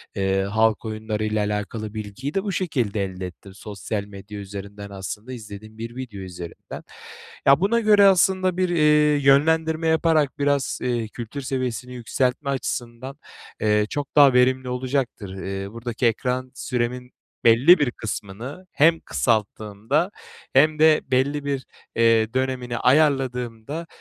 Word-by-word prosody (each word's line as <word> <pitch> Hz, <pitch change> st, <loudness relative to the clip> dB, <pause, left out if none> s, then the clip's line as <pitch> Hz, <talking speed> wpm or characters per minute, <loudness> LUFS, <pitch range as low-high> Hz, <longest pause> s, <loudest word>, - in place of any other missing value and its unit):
eee, 95 Hz, 0 st, +1 dB
halk 110 Hz, +2 st, +1 dB
oyunlarıyla 110 Hz, -1 st, -2 dB
alakalı 105 Hz, +1 st, -4 dB
bilgiyi 110 Hz, +7 st, -5 dB
de 195 Hz, -, 0 dB
bu 205 Hz, -, -2 dB
şekilde 125 Hz, -, -1 dB
elde 95 Hz, -1 st, -5 dB
ettim. 95 Hz, +2 st, -14 dB
Sosyal 100 Hz, 0 st, -5 dB
medya 100 Hz, +1 st, -10 dB
üzerinden, 100 Hz, +1 st, -8 dB
aslında 100 Hz, +5 st, -7 dB
izlediğim 110 Hz, -2 st, -10 dB
bir 115 Hz, +1 st, -7 dB
video 125 Hz, -6 st, -7 dB
üzerinden. 90 Hz, -2 st, -9 dB, 0.6 s
Ya, 140 Hz, +1 st, +6 dB
buna 220 Hz, +5 st, +2 dB
göre 210 Hz, -2 st, +5 dB
aslında 185 Hz, -1 st, +3 dB
bir, 185 Hz, -1 st, +1 dB
eee, 150 Hz, -3 st, +4 dB
yönlendirme 160 Hz, +3 st, +3 dB
yaparak, 160 Hz, -3 st, +2 dB
biraz, 140 Hz, -1 st, 0 dB
eee, 120 Hz, -3 st, -1 dB
kültür 120 Hz, +5 st, -7 dB
seviyesini 130 Hz, -2 st, -3 dB
yükseltme 125 Hz, +3 st, -1 dB
açısından, 130 Hz, 0 st, -4 dB, 0.4 s
eee, 105 Hz, 0 st, +3 dB
çok 145 Hz, -1 st, -5 dB
daha 140 Hz, -3 st, +7 dB
verimli 130 Hz, +1 st, +3 dB
olacaktır. 125 Hz, -6 st, -3 dB
Eee, 95 Hz, 0 st, -5 dB
buradaki 115 Hz, +1 st, -4 dB
ekran 125 Hz, +3 st, 0 dB
süremin 125 Hz, -1 st, -3 dB, 0.3 s
belli 130 Hz, +10 st, +7 dB
bir 145 Hz, -4 st, +1 dB
kısmını 115 Hz, -, -7 dB
hem 165 Hz, +3 st, +4 dB
kısalttığımda 110 Hz, -, -1 dB, 0.4 s
hem 155 Hz, +3 st, +4 dB
de 155 Hz, 0 st, +5 dB
belli 140 Hz, +3 st, +1 dB
bir, 140 Hz, -2 st, -2 dB, 0.3 s
eee, 115 Hz, -1 st, +3 dB
dönemini 130 Hz, -2 st, -2 dB
ayarladığımda, 130 Hz, +1 st, +1 dB
125 Hz, 130 wpm, -23 LUFS, 110-145 Hz, 0.6 s, daha